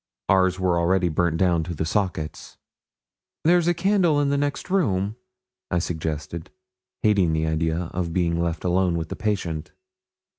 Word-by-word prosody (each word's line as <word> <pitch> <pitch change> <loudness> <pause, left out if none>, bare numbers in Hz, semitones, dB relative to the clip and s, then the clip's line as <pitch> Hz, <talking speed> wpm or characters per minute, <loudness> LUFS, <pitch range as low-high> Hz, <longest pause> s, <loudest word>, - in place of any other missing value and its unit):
Ours 95 -1 +3
were 90 -2 +2
already 90 +1 +2
burnt 85 0 +1
down 85 -2 +2
to 85 +1 -5
the 80 - -2
sockets. 90 -4 -3 0.9
'There's 175 +1 +4
a 175 - +4
candle 180 -4 +3
in 145 -1 +2
the 140 - +1
next 145 +5 -2
room,' 105 - +1 0.5
I 85 - 0
suggested, 80 0 -3 0.5
hating 100 -6 +3
the 80 0 0
idea 80 +1 -1
of 85 -1 -2
being 85 -1 0
left 85 -1 -2
alone 90 -1 +2
with 80 -1 -4
the - - -4
patient. 90 -7 -3
90 Hz, 155 wpm, -24 LUFS, 80-105 Hz, 0.9 s, There's